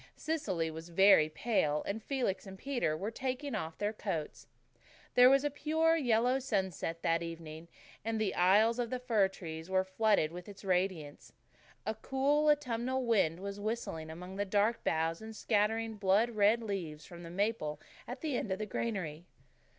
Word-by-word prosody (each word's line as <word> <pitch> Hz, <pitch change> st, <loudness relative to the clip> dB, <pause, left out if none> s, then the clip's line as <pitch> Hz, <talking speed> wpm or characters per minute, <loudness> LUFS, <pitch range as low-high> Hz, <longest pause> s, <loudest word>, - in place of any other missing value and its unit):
Cecily 185 Hz, -, -2 dB
was 160 Hz, +2 st, -9 dB
very 170 Hz, -3 st, +6 dB
pale, 155 Hz, -5 st, 0 dB
and 215 Hz, +3 st, -3 dB
Felix 240 Hz, -6 st, -2 dB
and 190 Hz, 0 st, -9 dB
Peter 240 Hz, -, -1 dB
were 200 Hz, +6 st, -3 dB
taking 260 Hz, +3 st, -3 dB
off 160 Hz, 0 st, -4 dB
their 205 Hz, +1 st, -1 dB
coats. 180 Hz, -8 st, -4 dB, 0.7 s
There 250 Hz, 0 st, +8 dB
was 275 Hz, +1 st, +4 dB
a 290 Hz, -, 0 dB
pure 320 Hz, +3 st, +2 dB
yellow 250 Hz, -3 st, +2 dB
sunset 190 Hz, -, -2 dB
that 165 Hz, 0 st, +2 dB
evening, 165 Hz, -1 st, -7 dB, 0.4 s
and 225 Hz, 0 st, -1 dB
the 215 Hz, -2 st, 0 dB
aisles 210 Hz, +6 st, +4 dB
of 240 Hz, -2 st, -1 dB
the 255 Hz, -, -2 dB
fir 225 Hz, -6 st, +2 dB
wood 160 Hz, -1 st, -7 dB
were 190 Hz, 0 st, +2 dB
flooded 190 Hz, -4 st, +2 dB
with 180 Hz, +3 st, -9 dB
its 200 Hz, 0 st, -12 dB
radiance. 180 Hz, -5 st, -1 dB, 0.5 s
A 220 Hz, -, 0 dB
cool, 285 Hz, +6 st, +1 dB
autumnal 260 Hz, -3 st, 0 dB
wind 190 Hz, -7 st, +2 dB
was 200 Hz, +1 st, -5 dB
whistling 205 Hz, -7 st, -3 dB
among 180 Hz, +4 st, -8 dB
the 205 Hz, -, +1 dB
dark 205 Hz, +3 st, +1 dB
boughs 165 Hz, +2 st, 0 dB
and 220 Hz, 0 st, -8 dB
scattering 220 Hz, +1 st, 0 dB
blood 205 Hz, +4 st, +3 dB
red 215 Hz, +2 st, +3 dB
leaves 170 Hz, -8 st, -4 dB
from 175 Hz, -1 st, -11 dB
the 170 Hz, -, -8 dB
maple 175 Hz, -5 st, -1 dB, 0.3 s
at 250 Hz, +2 st, -6 dB
the 305 Hz, -5 st, -1 dB
end 210 Hz, -, -2 dB
of 190 Hz, -, 0 dB
the 215 Hz, -, -3 dB
granary. 180 Hz, -8 st, -4 dB
205 Hz, 175 wpm, -33 LUFS, 170-235 Hz, 0.7 s, There